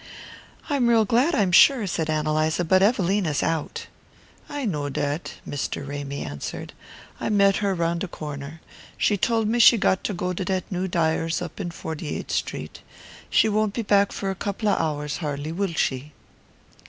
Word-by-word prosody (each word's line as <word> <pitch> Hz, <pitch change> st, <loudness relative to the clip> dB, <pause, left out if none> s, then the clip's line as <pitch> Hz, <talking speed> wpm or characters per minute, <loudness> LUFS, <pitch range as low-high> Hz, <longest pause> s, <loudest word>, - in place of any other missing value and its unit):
"I'm 280 Hz, -5 st, +1 dB
real 225 Hz, -2 st, +4 dB
glad, 255 Hz, -, +2 dB
I'm 195 Hz, -6 st, +2 dB
sure," 240 Hz, +5 st, +6 dB
said 165 Hz, -4 st, -2 dB
Ann 155 Hz, 0 st, 0 dB
Eliza; 155 Hz, +2 st, +1 dB
"but 185 Hz, +3 st, +4 dB
Evelina's 195 Hz, -, +2 dB
out." 165 Hz, -2 st, -2 dB, 0.6 s
"I 290 Hz, -2 st, -3 dB
know 150 Hz, -8 st, -2 dB
dat," 145 Hz, +3 st, -3 dB
Mr. 140 Hz, -1 st, -4 dB
Ramy 140 Hz, 0 st, -5 dB
answered. 70 Hz, -1 st, -6 dB, 0.5 s
"I -, -, -2 dB
met 200 Hz, -2 st, +4 dB
her 200 Hz, -2 st, 0 dB
round 170 Hz, 0 st, 0 dB
de 195 Hz, -, -2 dB
corner. 150 Hz, -1 st, -7 dB, 0.4 s
She 210 Hz, -, +2 dB
told 225 Hz, +2 st, +1 dB
me 235 Hz, +3 st, +1 dB
she 235 Hz, +1 st, +8 dB
got 190 Hz, -2 st, +1 dB
to 210 Hz, -, -1 dB
go 180 Hz, +1 st, -2 dB
to 185 Hz, -, -3 dB
dat 185 Hz, 0 st, -1 dB
new 185 Hz, +1 st, -1 dB
dyer's 165 Hz, -1 st, 0 dB
up 175 Hz, +3 st, -7 dB
in 185 Hz, -4 st, -3 dB
Forty 160 Hz, -2 st, -5 dB
eighth -, -, -7 dB
Street. -, -, -3 dB, 0.5 s
She -, -, +4 dB
won't 215 Hz, -1 st, 0 dB
be 230 Hz, -, -1 dB
back 200 Hz, -1 st, +3 dB
for 195 Hz, -1 st, -3 dB
a 190 Hz, -, -8 dB
couple 205 Hz, +1 st, -1 dB
of -, -, +2 dB
hours, 150 Hz, -2 st, -2 dB
har'ly, 150 Hz, -1 st, -4 dB
will 190 Hz, +1 st, -2 dB
she?" 140 Hz, +1 st, -1 dB
180 Hz, 180 wpm, -24 LUFS, 155-205 Hz, 0.6 s, she